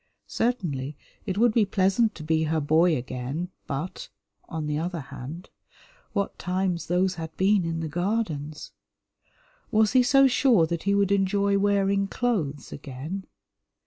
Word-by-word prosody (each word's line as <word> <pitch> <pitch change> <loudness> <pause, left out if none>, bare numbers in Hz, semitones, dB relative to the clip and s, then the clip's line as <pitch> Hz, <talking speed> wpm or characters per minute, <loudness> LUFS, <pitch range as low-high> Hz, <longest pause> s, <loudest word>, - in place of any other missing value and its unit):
Certainly 150 - -2 0.3
it 190 -1 -2
would 235 0 +4
be 225 - +4
pleasant 200 +3 +2
to 155 - -8
be 160 0 +1
her 160 +1 +1
boy 155 +2 +3
again, 130 +7 -4 0.2
but, 145 +6 -5 0.4
on 160 -1 -3
the 150 0 -1
other 170 +1 -3
hand, 150 +5 -8 0.6
what 200 -2 -2
times 180 -1 -1
those 180 +2 +2
had 160 0 -7
been 195 0 +3
in 165 0 -2
the 160 - -2
Gardens! 160 -4 -2 1.0
Was 215 -1 +3
he 255 - +5
so 275 +2 +5
sure 245 - +4
that 170 0 -3
he 200 0 +3
would 200 -1 +2
enjoy 200 0 +2
wearing 200 0 +2
clothes 180 - -2
again? 150 +7 -6
180 Hz, 145 wpm, -26 LUFS, 155-200 Hz, 1.0 s, he